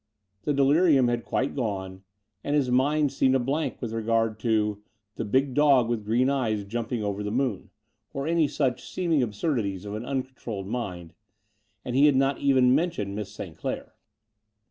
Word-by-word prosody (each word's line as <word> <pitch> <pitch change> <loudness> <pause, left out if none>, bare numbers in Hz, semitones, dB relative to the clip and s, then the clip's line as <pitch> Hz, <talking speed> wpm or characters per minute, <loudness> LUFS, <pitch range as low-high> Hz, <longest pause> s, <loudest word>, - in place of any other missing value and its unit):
The 150 - +1
delirium 140 -1 +4
had 120 -1 -1
quite 135 - -1
gone, 95 -7 -3 0.4
and 145 - 0
his 135 -4 +1
mind 145 +3 +2
seemed 135 -1 +3
a - - +3
blank 135 +3 -2
with 115 -3 -5
regard 115 -1 0
to 105 -2 0 0.3
the - - -3
big 130 +5 +1
dog 140 -4 +4
with 115 -3 -1
green 115 +4 +2
^es 115 -7 0
jumping 115 +1 -3
over 100 0 -2
the 105 - -3
moon," 125 -3 -1 0.4
or 140 0 -4
any 165 -1 +2
such 130 -3 -2
seeming 165 -6 +1
absurdities 105 - -2
of 100 - -5
an 110 - -4
tmcontroUed 130 -6 -4
mind; 90 -7 -5 0.7
and 125 - -3
he 140 +3 +6
had 145 - +4
not 135 +1 +2
even 130 -3 +4
mentioned 140 - 0
Miss 105 -2 -5
St. 95 -5 -8
Clair. - - -5
125 Hz, 170 wpm, -26 LUFS, 105-140 Hz, 0.7 s, he